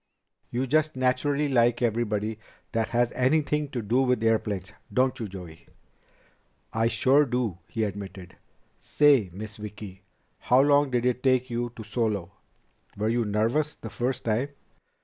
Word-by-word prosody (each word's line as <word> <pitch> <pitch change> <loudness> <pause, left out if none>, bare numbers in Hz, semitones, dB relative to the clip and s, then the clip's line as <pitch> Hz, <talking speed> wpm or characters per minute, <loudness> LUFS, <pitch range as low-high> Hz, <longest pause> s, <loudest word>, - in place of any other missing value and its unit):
"You 125 +2 -1
just 155 +3 +1
naturally 140 +3 +1
like 120 -2 +2
everybody 110 -2 -1 0.3
that 115 -1 0
has 120 +1 +1
anything 150 +3 +1
to 120 -4 -4
do 120 +6 +2
with 125 -3 +1
airplanes, 105 -3 0 0.2
don't 130 +1 +1
you, 110 - -3
Joey?" 85 -4 -10 1.1
"I 115 0 +2
sure 130 +5 +4
do," 120 - -2
he 110 - -2
admitted. 95 -3 -6 0.4
"Say, 140 -10 +3
Miss 105 +3 -8
Vicki, 105 -2 -9 0.4
how 125 +2 +3
long 145 0 +4
did 125 -1 0
it 125 0 +1
take 130 -1 +2
you 120 0 -2
to 110 - -8
solo? 105 -4 -2 0.7
Were 105 +2 0
you 120 0 +1
nervous 115 +9 0
the 115 - -9
first 125 +1 -2
time?" 115 +5 0
120 Hz, 150 wpm, -26 LUFS, 105-130 Hz, 1.1 s, sure